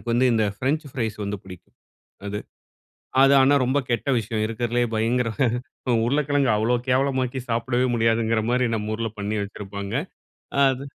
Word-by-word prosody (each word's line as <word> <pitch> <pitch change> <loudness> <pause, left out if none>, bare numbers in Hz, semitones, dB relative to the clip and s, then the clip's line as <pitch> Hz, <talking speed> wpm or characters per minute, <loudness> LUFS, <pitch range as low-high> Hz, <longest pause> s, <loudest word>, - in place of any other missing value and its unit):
எனக்கு - - -20
வந்து 125 +2 +3
இந்த 110 -1 +2
ஃப்ரெஞ்ச் 145 +7 -1
ஃப்ரைஸ் 110 -4 -3
வந்து 100 +1 -3
பிடிக்கும். 90 -2 -13 0.5
அது 105 +1 -3 0.8
அது 135 - +6
ஆனா 140 +2 +5
ரொம்ப 130 +3 +1
கெட்ட 120 +2 -1
விஷயம். 110 0 -2
இருக்கிறதுலேயே 120 +2 -1
பயங்கர 115 +2 +1 0.6
அ - - +3
உருளைக்கிழங்கு 145 0 +2
அவ்ளோ 115 +3 +1
கேவலமாக்கி 130 0 +1
சாப்பிடவே 120 +2 +1
முடியாதுங்கிற 115 -1 +2
மாரி 125 0 +2
நம்ம 110 0 -2
ஊர்ல 115 +1 -2
பண்ணி 105 +2 -2
வச்சிருப்பாங்க. 100 0 -6 0.7
அது 135 +1 0
115 Hz, 150 wpm, -24 LUFS, 110-130 Hz, 0.8 s, அது